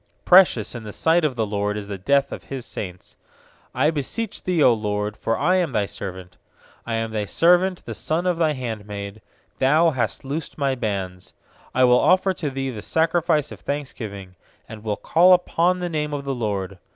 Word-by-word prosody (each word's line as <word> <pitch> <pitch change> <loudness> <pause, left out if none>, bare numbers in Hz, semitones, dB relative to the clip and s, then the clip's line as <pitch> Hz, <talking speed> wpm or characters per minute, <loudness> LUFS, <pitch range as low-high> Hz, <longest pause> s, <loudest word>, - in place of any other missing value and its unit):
15Precious 175 - +5
in 120 - -5
the 105 - -7
sight 165 +8 +2
of 145 -4 0
the 115 -2 0
LORD 105 0 -2
Is 105 - -5
the 100 -2 -6
death 140 +7 +2
of - - -7
His 135 -3 -6
saints. 90 -2 -7 0.6
16I 150 +6 +2
beseech 190 - -3
Thee, 180 -1 -1
0 130 -6 +6
LORD, 105 -1 -2
for 115 +1 -1
I 180 +6 +2
am 175 -7 0
Thy 105 -2 +1
servant; 95 -2 -7 0.5
I 115 - -1
am 115 0 -2
Thy 105 -1 -2
servant, 180 - +2
the 115 - -5
son 160 - -1
of 180 -2 +1
Thy 160 -2 +2
handmaid; 105 -5 -6 0.4
Thou 155 +5 +4
hast 120 -4 -2
loosed 150 +4 -5
my 140 -2 +1
bands. 95 -6 -4 0.4
17I 130 0 +5
will 125 0 +5
offer 185 +1 +3
to 160 -5 -3
Thee 135 0 -3
the 110 -4 -7
sacrifice 165 - +1
of - - -9
thanksgiving, 110 -10 -6 0.3
And 110 -1 -10
will 105 -2 -2
call 180 +3 +5
upon 180 0 +2
the 180 -1 -3
name 150 -2 -2
of 140 -1 -5
the 135 - -1
LORD. 100 -6 -3
130 Hz, 195 wpm, -23 LUFS, 105-160 Hz, 0.6 s, 0